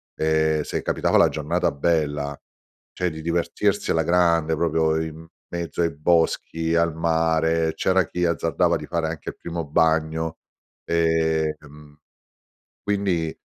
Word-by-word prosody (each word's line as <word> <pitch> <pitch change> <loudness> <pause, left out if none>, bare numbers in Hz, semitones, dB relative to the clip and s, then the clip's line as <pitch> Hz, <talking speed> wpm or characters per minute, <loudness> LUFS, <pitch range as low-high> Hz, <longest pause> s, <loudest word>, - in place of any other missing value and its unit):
ehm, 80 0 +1
se - - -3
capitava - - +1
la - - +5
giornata - - -1
bella, 75 -2 -1 0.5
cioè 90 -1 -1
di 80 0 -8
divertirsi 85 +4 0
alla 80 - +2
grande, 85 -2 +2
proprio 80 0 +1
in 80 0 -7 0.2
mezzo 85 -1 -4
ai 85 - +2
boschi, 80 0 +1
al 85 -1 +2
mare, 80 0 +1
c'era 95 -1 +2
chi 90 +2 -3
azzardava 85 -2 +1
di - - -8
fare 85 -1 -2
anche 80 -2 -5
il - - -8
primo 85 -1 -5
bagno. 80 +1 +1 0.5
Ehm, 80 -3 -1 0.9
quindi 95 -6 -1
80 Hz, 130 wpm, -23 LUFS, 80-85 Hz, 0.9 s, la